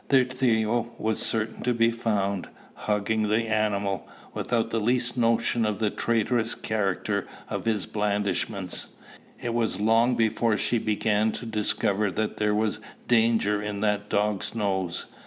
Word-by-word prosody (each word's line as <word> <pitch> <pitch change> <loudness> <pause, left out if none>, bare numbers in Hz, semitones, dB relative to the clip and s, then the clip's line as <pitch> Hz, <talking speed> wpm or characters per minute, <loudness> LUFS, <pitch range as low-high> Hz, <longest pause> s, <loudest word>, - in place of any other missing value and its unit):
There 130 -2 +5
Theo 120 -2 0
was 110 -1 -1
certain 110 -1 -1
to 125 -1 +1
be 115 0 +4
found, 100 -5 -1 0.2
hugging 105 +1 0
the 110 +2 +1
animal, 100 -4 0 0.2
without 115 -1 -1
the 115 - +1
least 120 +2 +1
notion 115 -1 +2
of 105 -2 0
the 110 -2 0
traitorous 115 0 0
character 100 -4 -1 0.2
of - - -3
his 110 -4 0
blandishments: 100 -2 -1 0.5
it 120 - -3
was 115 -4 0
long 115 +3 +3
before 115 -1 +2
she 120 - +1
began 110 0 +1
to 120 - -6
discover 105 -2 0
that 110 +3 -2
there 105 0 +1
was 110 0 0 0.3
danger 115 -3 +3
in 105 -1 -4
that 105 -1 0
dog's 105 0 0
nose. 95 -5 -1
110 Hz, 145 wpm, -26 LUFS, 105-115 Hz, 0.5 s, There